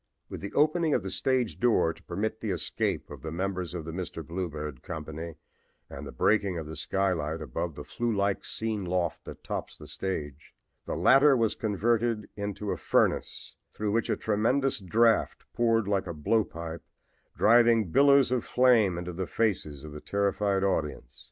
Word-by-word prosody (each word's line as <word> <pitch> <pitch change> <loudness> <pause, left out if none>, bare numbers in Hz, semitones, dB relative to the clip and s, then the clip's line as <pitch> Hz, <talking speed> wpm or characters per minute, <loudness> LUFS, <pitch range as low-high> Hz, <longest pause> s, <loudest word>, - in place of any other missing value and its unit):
With - - -7
the 100 - -5
opening 155 +1 +3
of 110 - 0
the 95 - -4
stage 120 +5 0
door 110 -9 +3
to - - -19
permit 110 +5 -3
the 110 - -3
escape 90 -4 -1
of 70 -3 -9
the 80 - -5
members 90 0 -3
of 80 -3 -5
the 80 - -5
'Mr. 85 -2 -5
Bluebeard' 75 -5 -5
company 80 +1 -6 0.6
and - - -7
the - - -7
breaking 100 - +1
of 80 - -4
the 80 +1 -7
skylight 80 -1 -1
above 75 +2 -4
the 75 - -7
flue 120 +9 -2
like 100 -2 0
scene 110 -2 -2
loft 90 -2 -2
that - - -10
tops - - -5
the - - -12
stage, 75 -6 -5 0.3
the - - -2
latter 135 0 +6
was 115 -2 +2
converted 115 +1 0
into 100 0 -4
a - - -2
furnace - - 0 0.2
through 105 -1 -2
which 115 +2 0
a - - +1
tremendous 120 +5 +1
draft 110 +4 +2
poured 115 -3 +2
like 100 -2 0
a 85 - -5
blow 110 +9 +2
pipe, 85 -2 -7 0.6
driving 115 -4 +5
billows 140 - +5
of 125 -3 +1
flame 115 -8 +3
into 90 0 -5
the 90 +1 -3
faces 80 -10 -1
of 75 - -8
the 75 0 -8
terrified 100 -1 0
audience. 75 -9 -2
95 Hz, 175 wpm, -28 LUFS, 85-115 Hz, 0.6 s, latter